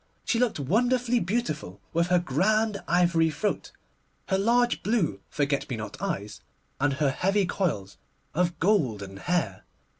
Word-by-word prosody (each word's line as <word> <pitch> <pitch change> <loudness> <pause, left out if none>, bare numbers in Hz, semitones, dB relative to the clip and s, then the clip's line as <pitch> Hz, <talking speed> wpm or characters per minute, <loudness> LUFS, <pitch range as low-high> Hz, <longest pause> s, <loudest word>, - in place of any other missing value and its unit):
She 230 - +1
looked 245 -9 +1
wonderfully 245 - +2
beautiful 155 - -2
with 170 +1 +2
her 180 0 +4
grand 200 +7 +1
ivory 170 -2 +3
throat, 210 +7 -2 0.6
her 190 - +3
large 240 +4 +2
blue 190 - 0
forget 140 -1 -1
me 125 - -2
not 110 +8 -7
eyes, 150 - -3 0.4
and 145 0 +2
her 140 0 +1
heavy 195 +6 +1
coils 115 - -2 0.4
of 175 +1 0
golden 115 - +1
hair. 110 - -1
175 Hz, 140 wpm, -27 LUFS, 140-210 Hz, 0.6 s, her